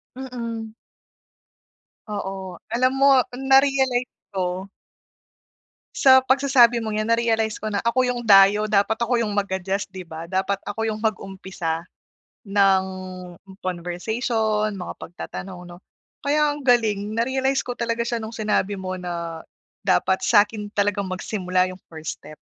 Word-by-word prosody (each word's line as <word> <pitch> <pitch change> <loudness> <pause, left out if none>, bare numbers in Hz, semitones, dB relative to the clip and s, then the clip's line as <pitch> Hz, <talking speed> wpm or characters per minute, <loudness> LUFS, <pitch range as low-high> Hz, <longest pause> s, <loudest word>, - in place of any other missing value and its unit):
Mm. 230 -4 -6 1.4
Oo. 190 -3 -5
Alam 245 +3 +2
mo, 275 +1 +6 0.4
narealize 265 -2 +3 0.2
ko 185 +1 -2 1.3
sa 260 -1 +6
pagsasabi 255 -3 +4
mong 215 -1 -3
'yan, 215 0 -1
na-realize 225 -2 0
ko 215 - -2
na 205 - -1
ako 235 +2 +3
yung 250 -1 0
dayo, 200 0 +6
dapat 210 +1 +2
ako 235 +1 -1
yung 220 - -1
mag-adjust, 195 -1 -2
di 190 - -6
ba? 165 -2 -8
Dapat 190 +2 -1
ako 225 +2 -2
yung 215 - -3
mag-umpisa 190 -6 -3 0.6
ng 195 -1 +4 0.7
conversation, 215 +5 -1
mga 180 - -6
pagtatanong 180 +1 -8
'no. 175 0 -11 0.4
Kaya 295 +1 +2
ang 295 - -8
galing, 220 -4 +1
na-realize 265 +3 0
ko 245 - -3
talaga 235 0 -2
siya 235 -1 -2
nung 220 - -5
sinabi 210 -3 0
mo 185 0 -4
na 170 -3 -5 0.4
dapat 190 - +2
sa'kin 210 -1 +2
talagang 205 -1 0
magsimula 185 -1 0
yung 185 0 -10
first 160 -2 -7
step. 155 +1 -11
210 Hz, 130 wpm, -23 LUFS, 190-235 Hz, 1.4 s, mo